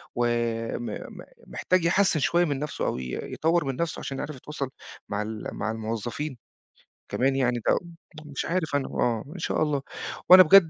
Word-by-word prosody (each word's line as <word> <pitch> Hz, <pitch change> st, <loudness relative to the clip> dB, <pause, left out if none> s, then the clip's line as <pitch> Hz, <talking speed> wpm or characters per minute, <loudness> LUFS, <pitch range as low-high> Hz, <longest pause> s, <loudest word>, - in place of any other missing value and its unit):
وم 120 Hz, -1 st, 0 dB
م -, -, -7 dB, 0.3 s
محتاج 185 Hz, -2 st, +1 dB
يحسِّن 185 Hz, -2 st, +4 dB
شوية 175 Hz, +4 st, +3 dB
من 145 Hz, -4 st, -1 dB
نفسه، 150 Hz, +1 st, -2 dB
أو -, -, 0 dB
ي 65 Hz, -1 st, -4 dB
يطوّر 165 Hz, 0 st, +2 dB
من 135 Hz, -1 st, -1 dB
نفسه، 170 Hz, +3 st, -2 dB
عشان 135 Hz, -, -4 dB
يعرف 150 Hz, -, -4 dB
يتواصل 140 Hz, 0 st, -5 dB, 0.4 s
مع 100 Hz, 0 st, -1 dB
ال 110 Hz, 0 st, -4 dB
مع 110 Hz, -, -2 dB
الموظَّفين. 115 Hz, +5 st, -3 dB, 0.7 s
كمان 135 Hz, +1 st, +2 dB
يعني 125 Hz, -2 st, +2 dB
ده -, -, +6 dB
و -, -, +1 dB, 0.5 s
مش 140 Hz, -, -2 dB
عارِف 165 Hz, -4 st, 0 dB
أنا، 140 Hz, -2 st, +1 dB
آه، 115 Hz, -3 st, 0 dB
إن 185 Hz, -, -7 dB
شاء 160 Hz, -, 0 dB
الله. 150 Hz, -3 st, +1 dB, 0.5 s
وأنا 185 Hz, +1 st, +12 dB
بجد 195 Hz, +3 st, +9 dB
135 Hz, 180 wpm, -27 LUFS, 120-165 Hz, 0.7 s, وأنا